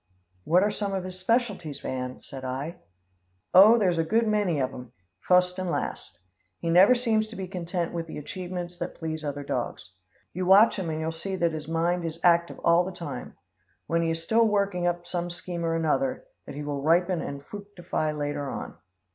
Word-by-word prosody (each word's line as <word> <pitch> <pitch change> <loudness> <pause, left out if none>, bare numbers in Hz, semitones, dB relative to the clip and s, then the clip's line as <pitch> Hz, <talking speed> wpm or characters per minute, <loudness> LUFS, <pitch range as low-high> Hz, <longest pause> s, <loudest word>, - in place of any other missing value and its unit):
"What 180 +4 +4
are 210 - +2
some 200 -1 -2
of 190 - -2
his 185 0 -7
specialties, 190 - 0
Van?" 125 -1 -4
said 135 -2 -9
I. 135 +7 -4 0.8
"Oh, 210 +5 +9
there's 180 -6 +2
a - - +3
good 225 +7 +2
many 205 -7 +1
of 130 0 -1
'em, 125 -1 -10 0.3
fust 180 - +3
and 185 -1 -2
last. 70 - -4 0.4
He 165 - -2
never 190 +8 +7
seems 225 -3 +1
to 220 - -11
be 190 -1 -5
content 175 -2 -3
with 165 -1 -3
the - - -7
achievements 175 +2 -6
that - - -4
please 160 -1 -4
other 145 -1 -4
dogs. 120 -8 -4 0.4
You 185 +1 -2
watch 200 +3 +6
him 175 -3 -3
and 155 0 -2
you'll 160 +1 -2
see 190 +4 -4
that 170 -2 +1
his 155 -2 -6
mind 170 +2 0
is 165 0 -5
active 170 -1 +3
all 170 +1 +5
the 185 - -5
time. 175 -2 -7 0.5
When 165 0 +1
he 165 - +1
is 165 0 -2
still 225 +7 +3
he's - - +3
working 200 -4 +1
up 175 0 -1
some 175 0 -3
scheme 175 0 -5
or 165 0 0
another, 255 - 0 0.2
that - - -8
he 150 - -5
will 145 -1 -3
ripen 175 +3 +2
and 140 0 -6
fructify 195 -6 -4
later 145 -1 -3
on. - - -5
175 Hz, 205 wpm, -27 LUFS, 155-190 Hz, 0.8 s, Oh